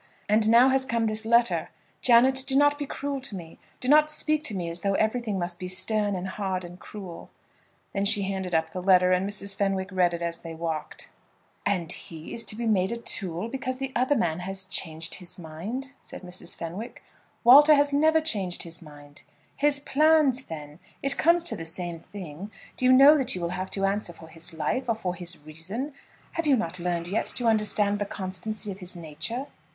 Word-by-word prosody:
And 215 Hz, +1 st, +3 dB
now 240 Hz, +3 st, +7 dB
has 265 Hz, 0 st, +2 dB
come 230 Hz, -3 st, 0 dB
this 220 Hz, 0 st, -2 dB
letter. 235 Hz, +1 st, +3 dB, 0.3 s
Janet, 260 Hz, +2 st, +5 dB
do 270 Hz, -, +1 dB
not 290 Hz, +1 st, +4 dB
be 290 Hz, -, -3 dB
cruel 280 Hz, -1 st, -4 dB
to 255 Hz, -6 st, -6 dB
me. 165 Hz, -3 st, -10 dB, 0.2 s
Do 250 Hz, -, -5 dB
not 300 Hz, +2 st, +6 dB
speak 305 Hz, 0 st, 0 dB
to 215 Hz, -, -1 dB
me 175 Hz, -3 st, -3 dB
as 170 Hz, +1 st, -2 dB
though 195 Hz, -1 st, 0 dB
everything 220 Hz, -1 st, 0 dB
must 175 Hz, -1 st, -4 dB
be 185 Hz, -, -5 dB
stern 200 Hz, +2 st, 0 dB
and 185 Hz, +1 st, -4 dB
hard 190 Hz, -2 st, -3 dB
and 175 Hz, +1 st, -11 dB
cruel." 190 Hz, -5 st, -9 dB, 0.6 s
Then 195 Hz, 0 st, 0 dB
she 205 Hz, -1 st, +4 dB
handed 190 Hz, -2 st, -2 dB
up 160 Hz, 0 st, 0 dB
the 185 Hz, -, -5 dB
letter, 185 Hz, -1 st, +5 dB
and 185 Hz, +2 st, +1 dB
Mrs. 200 Hz, -1 st, -3 dB
Fenwick 195 Hz, -1 st, -1 dB
read 180 Hz, -2 st, +2 dB
it 170 Hz, -, -5 dB
as 170 Hz, 0 st, -2 dB
they 165 Hz, -1 st, -8 dB
walked. 160 Hz, -2 st, -5 dB, 0.6 s
"And 175 Hz, -5 st, 0 dB
is -, -, -2 dB
he 160 Hz, -1 st, -9 dB
to 230 Hz, -2 st, -4 dB
be 235 Hz, +1 st, -4 dB
made 195 Hz, -3 st, +2 dB
a 235 Hz, -, -2 dB
tool, 190 Hz, -4 st, -1 dB
because 255 Hz, +1 st, -4 dB
the 270 Hz, 0 st, -4 dB
other 255 Hz, +4 st, +2 dB
man 165 Hz, -, 0 dB
has 190 Hz, +1 st, -5 dB
changed 160 Hz, -3 st, +1 dB
his 180 Hz, -2 st, -8 dB
mind?" 195 Hz, -, -6 dB
said -, -, -10 dB
Mrs. 180 Hz, -1 st, -6 dB
Fenwick. 180 Hz, +8 st, -7 dB, 0.4 s
"Walter 295 Hz, +5 st, +9 dB
has 285 Hz, 0 st, +2 dB
never 315 Hz, +2 st, +4 dB
changed 200 Hz, -, +1 dB
his 170 Hz, 0 st, -5 dB
mind." 145 Hz, -2 st, -13 dB, 0.3 s
"His 285 Hz, 0 st, +2 dB
plans, 290 Hz, -2 st, +3 dB
then. 150 Hz, -1 st, -9 dB, 0.2 s
It 275 Hz, 0 st, +2 dB
comes 340 Hz, +1 st, +3 dB
to 340 Hz, -, -2 dB
the 165 Hz, -, -6 dB
same 170 Hz, +1 st, -5 dB
thing. 185 Hz, 0 st, -9 dB, 0.3 s
Do 255 Hz, -, -1 dB
you 255 Hz, -, +6 dB
know 275 Hz, +4 st, +8 dB
that 255 Hz, -7 st, +1 dB
you 180 Hz, -, -5 dB
will 170 Hz, -, -1 dB
have 185 Hz, +1 st, -4 dB
to 195 Hz, -1 st, -1 dB
answer 195 Hz, -2 st, -1 dB
for 160 Hz, -1 st, -14 dB
his 165 Hz, 0 st, -4 dB
life, 165 Hz, -, -2 dB
or 230 Hz, -, +2 dB
for 185 Hz, -5 st, -3 dB
his 175 Hz, 0 st, -4 dB
reason? 190 Hz, -, -5 dB, 0.4 s
Have 330 Hz, -2 st, -2 dB
you 280 Hz, -, +5 dB
not 180 Hz, -6 st, -3 dB
learned 170 Hz, -1 st, -2 dB
yet 195 Hz, +5 st, -1 dB
to 245 Hz, -, +1 dB
understand 210 Hz, -2 st, +2 dB
the 205 Hz, -, -1 dB
constancy 200 Hz, +3 st, -4 dB
of 190 Hz, -, -9 dB
his 180 Hz, -1 st, -5 dB
nature?" 170 Hz, -, -3 dB
200 Hz, 210 wpm, -26 LUFS, 175-255 Hz, 0.6 s, Walter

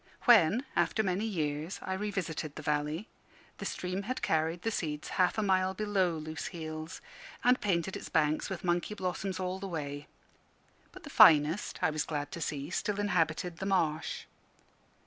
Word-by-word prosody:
When, 230 Hz, -, +6 dB
after 220 Hz, -, +2 dB
many 190 Hz, +2 st, 0 dB
years, 155 Hz, -4 st, -2 dB
I 190 Hz, -, -2 dB
revisited 190 Hz, -7 st, -3 dB
the 155 Hz, -, -7 dB
valley, 150 Hz, +6 st, -1 dB, 0.5 s
the -, -, -3 dB
stream 185 Hz, +2 st, -3 dB
had 255 Hz, -, -3 dB
carried 160 Hz, +2 st, 0 dB
the 225 Hz, -, 0 dB
seeds 150 Hz, -7 st, -3 dB
half 185 Hz, +3 st, +2 dB
a 215 Hz, -, +1 dB
mile 190 Hz, -1 st, +2 dB
below 190 Hz, -5 st, +1 dB
Loose 155 Hz, +1 st, -5 dB
heels, 155 Hz, -1 st, -6 dB, 0.4 s
and 250 Hz, +1 st, +4 dB
painted 190 Hz, -2 st, 0 dB
its -, -, -7 dB
banks 155 Hz, -1 st, +1 dB
with 190 Hz, -2 st, -5 dB
monkey 175 Hz, +4 st, 0 dB
blossoms 185 Hz, 0 st, -3 dB
all 185 Hz, 0 st, -2 dB
the 195 Hz, -, -5 dB
way. 145 Hz, -4 st, -5 dB, 0.8 s
But -, -, -13 dB
the -, -, -9 dB
finest, 155 Hz, +4 st, +6 dB
I -, -, +4 dB
was 155 Hz, 0 st, -1 dB
glad 145 Hz, 0 st, -4 dB
to 170 Hz, -3 st, -6 dB
see, 145 Hz, +1 st, -3 dB
still 205 Hz, +2 st, -1 dB
inhabited 175 Hz, -3 st, 0 dB
the 190 Hz, -, -4 dB
marsh. 160 Hz, -5 st, 0 dB
175 Hz, 165 wpm, -31 LUFS, 155-195 Hz, 0.8 s, When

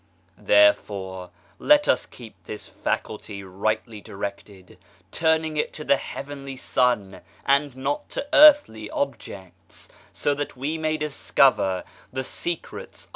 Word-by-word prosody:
Therefore 100 Hz, -3 st, +2 dB, 0.3 s
let 295 Hz, 0 st, +4 dB
us -, -, +2 dB
keep 115 Hz, -3 st, -12 dB
this 105 Hz, -, -7 dB
faculty 105 Hz, -2 st, -4 dB
rightly 110 Hz, +3 st, -3 dB
directed 100 Hz, -2 st, -8 dB, 0.3 s
turning 160 Hz, -1 st, +1 dB
it -, -, -1 dB
to 150 Hz, -, -7 dB
the 140 Hz, -, +3 dB
heavenly 140 Hz, -1 st, -7 dB
Sun 120 Hz, -7 st, 0 dB, 0.2 s
and 140 Hz, 0 st, +2 dB
not 290 Hz, -, -3 dB
to -, -, -4 dB
earthly 290 Hz, -, +6 dB
objects 105 Hz, -9 st, -6 dB, 0.2 s
so 145 Hz, -, 0 dB
that 145 Hz, -2 st, -5 dB
we 145 Hz, +5 st, -2 dB
may 155 Hz, 0 st, 0 dB
discover 135 Hz, -9 st, +2 dB, 0.3 s
the 130 Hz, 0 st, -3 dB
secrets 170 Hz, +5 st, -6 dB
130 Hz, 120 wpm, -24 LUFS, 100-150 Hz, 0.3 s, earthly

